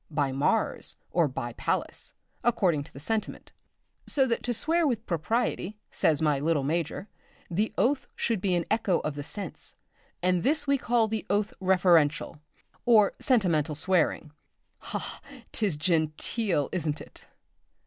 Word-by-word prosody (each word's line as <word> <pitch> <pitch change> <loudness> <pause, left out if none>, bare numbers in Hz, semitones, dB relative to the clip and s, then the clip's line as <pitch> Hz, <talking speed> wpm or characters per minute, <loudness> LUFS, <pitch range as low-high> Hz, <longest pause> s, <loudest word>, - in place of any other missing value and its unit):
by 145 -3 0
Mars! 135 +2 0
or 170 -2 +3
by 120 -3 -5
Pallas! - - -3 0.3
according 185 -11 +2
to - - -16
the 135 - -11
sentiment, 220 +8 -3 0.6
so 270 -3 +2
that 235 -3 -1
to 245 - -1
swear 320 +8 +1
with 230 -4 -1
propriety, 205 +3 -1
says 155 -1 +2
my 150 -3 +2
little 150 -1 +1
major, 165 +6 -2 0.4
the 210 +6 0
oath 270 +2 +1
should 225 -5 -1
be 190 -2 +1
an 170 -2 0
echo 205 -5 +2
of 150 - -2
the 145 - -5
sense; 185 +4 -6 0.5
and 180 -1 +2
this 290 - +1
we 280 -1 +2
call 235 -2 +2
the 220 0 -2
oath 205 +2 +1
referential, 175 -6 +3 0.4
or 220 -4 +5
sentimental 170 - +2
swearing 160 -2 +1 0.5
ha! - - -4
ha! - - -7 0.3
'tis 200 -9 0
genteel, 160 - 0
isn't 155 -4 -1
it? - - -13
180 Hz, 150 wpm, -28 LUFS, 155-225 Hz, 0.6 s, or